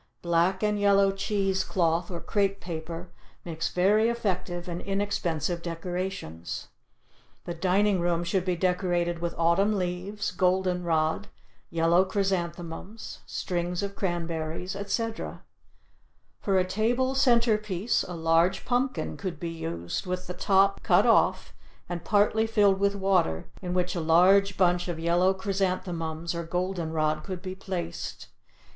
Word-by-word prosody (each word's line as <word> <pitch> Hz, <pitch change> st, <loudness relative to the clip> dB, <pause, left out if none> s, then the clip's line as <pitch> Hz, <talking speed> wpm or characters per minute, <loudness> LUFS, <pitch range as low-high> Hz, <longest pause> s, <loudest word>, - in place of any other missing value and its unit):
Black 175 Hz, +3 st, +2 dB
and 210 Hz, -1 st, +1 dB
yellow 200 Hz, -1 st, +4 dB
cheese 195 Hz, -1 st, 0 dB
cloth 170 Hz, -1 st, 0 dB
or 175 Hz, -2 st, -4 dB
crepe 200 Hz, 0 st, 0 dB
paper 170 Hz, +1 st, -6 dB, 0.3 s
makes 165 Hz, -2 st, -3 dB
very 210 Hz, +5 st, +3 dB
effective 180 Hz, -6 st, -2 dB
and 175 Hz, 0 st, -4 dB
inexpensive 180 Hz, -4 st, -1 dB
decorations. 170 Hz, -, -5 dB, 0.8 s
The 175 Hz, -, -3 dB
dining 190 Hz, +3 st, +2 dB
room 170 Hz, 0 st, +1 dB
should 175 Hz, +1 st, 0 dB
be 180 Hz, -1 st, 0 dB
decorated 175 Hz, -1 st, 0 dB
with 170 Hz, 0 st, -3 dB
autumn 185 Hz, +6 st, +3 dB
leaves, 185 Hz, +3 st, -3 dB
golden 180 Hz, 0 st, +1 dB
rod, 160 Hz, -2 st, 0 dB, 0.4 s
yellow 170 Hz, +2 st, +3 dB
chrysanthemums, 190 Hz, 0 st, -3 dB
strings 175 Hz, +1 st, -2 dB
of 200 Hz, 0 st, -4 dB
cranberries, 170 Hz, 0 st, -3 dB
etc. 220 Hz, +3 st, -3 dB, 1.0 s
For 195 Hz, -2 st, +1 dB
a 185 Hz, -, +3 dB
table 240 Hz, +7 st, +1 dB
center 235 Hz, -5 st, +4 dB
piece 210 Hz, +1 st, 0 dB
a 180 Hz, -, -5 dB
large 165 Hz, +3 st, +2 dB
pumpkin 255 Hz, +2 st, -1 dB
could 180 Hz, -6 st, -5 dB
be 170 Hz, 0 st, -4 dB
used 85 Hz, -, -4 dB
with 180 Hz, 0 st, -3 dB
the 180 Hz, -, -5 dB
top 195 Hz, +1 st, +3 dB
cut -, -, +4 dB
off -, -, +3 dB, 0.3 s
and 175 Hz, -1 st, -5 dB
partly 210 Hz, +3 st, +3 dB
filled 205 Hz, -3 st, +3 dB
with 200 Hz, 0 st, +2 dB
water 190 Hz, -, +1 dB, 0.2 s
in 180 Hz, -1 st, -3 dB
which 180 Hz, 0 st, 0 dB
a 175 Hz, -, -2 dB
large 185 Hz, +5 st, +4 dB
bunch 175 Hz, -1 st, +2 dB
of 175 Hz, -2 st, -3 dB
yellow 175 Hz, +3 st, +3 dB
chrysanthemums 180 Hz, -4 st, -2 dB
or 170 Hz, -, -3 dB
golden 175 Hz, 0 st, -2 dB
rod 155 Hz, -1 st, 0 dB
could 185 Hz, -2 st, -6 dB
be 185 Hz, -1 st, -4 dB
placed. 180 Hz, -3 st, -5 dB
180 Hz, 140 wpm, -27 LUFS, 170-195 Hz, 1.0 s, yellow